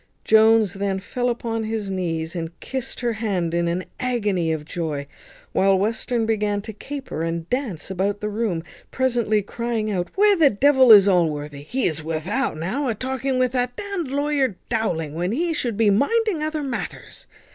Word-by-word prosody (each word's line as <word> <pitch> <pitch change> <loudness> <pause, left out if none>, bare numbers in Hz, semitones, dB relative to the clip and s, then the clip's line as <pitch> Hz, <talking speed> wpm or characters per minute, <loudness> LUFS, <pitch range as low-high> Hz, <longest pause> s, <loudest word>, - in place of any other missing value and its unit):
Jones 220 -2 +5
then 195 -1 -1
fell 245 +6 -2
upon 230 -1 -2
his 215 -2 -3
knees, 165 -3 -2
and 165 0 -5
kissed 260 -1 -5
her 240 -1 0
hand 195 -7 -1
in 170 0 +1
an 175 +2 -1
agony 205 -10 0
of 155 -1 -3
joy, 155 -4 -3 0.5
while 195 0 +3
Western 225 +3 0
began 210 -2 0
to 220 0 -7
caper 270 - -6
and 165 0 -2
dance 240 - -2
about 195 +2 -1
the 210 - -3
room, 210 -6 -1 0.3
presently 235 -5 +1
crying 225 0 -2
out 180 -3 -1
"Where 410 +1 +5
the 320 -6 +5
devil 265 +2 +5
is 205 -2 +9
Allworthy? 150 -6 +1
He 250 - -2
is 155 -2 -1
without 165 - -2
now, 230 - -2
a 230 - 0
talking 260 +2 -2
with 255 -1 +2
that 245 -1 -1
d - - -6 0.2
d 275 - -8
lawyer 280 -4 0
Dowling, 170 -10 -1
when 175 +5 -1
he 330 +5 0
should 240 -8 -2
be 215 -2 +4
minding 385 - +2
other 310 -1 -2
matters." 260 -4 -6
215 Hz, 180 wpm, -23 LUFS, 180-255 Hz, 0.5 s, is